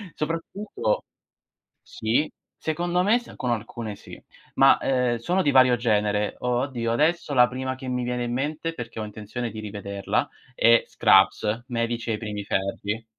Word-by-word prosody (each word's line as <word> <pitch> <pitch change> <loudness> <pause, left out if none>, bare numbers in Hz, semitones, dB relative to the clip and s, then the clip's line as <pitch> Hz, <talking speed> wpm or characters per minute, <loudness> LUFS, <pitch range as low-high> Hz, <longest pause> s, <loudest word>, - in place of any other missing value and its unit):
Soprattutto 165 - -2 0.8
sì, 115 +8 0 0.3
secondo 175 +3 0
me 215 +5 +4
s 240 - -13
con 125 - -2
alcune 110 -1 -4
sì, - - -12 0.4
ma, 135 0 +6
ehm, 125 -2 +1
sono 175 +11 0
di 145 - +3
vario 130 -2 +6
genere. 105 -3 +1
O 125 0 0
oddio, 120 -4 -2
adesso 150 +4 +1
la 125 -2 +6
prima 130 +1 -4
che 130 0 -9
mi 125 -1 -1
viene 125 0 -2
in 120 0 -2
mente, 150 +5 -2
perché 115 -6 -7
ho 110 - -3
intenzione 110 +3 -5
di 110 - -7
rivederla, 100 -2 -2 0.3
è 115 -1 +5
Scrubs: 105 +4 +3
medici 115 -1 -2
ai 110 - 0
primi 105 -2 -5
ferri. 100 +3 -2
120 Hz, 160 wpm, -25 LUFS, 110-135 Hz, 0.8 s, ma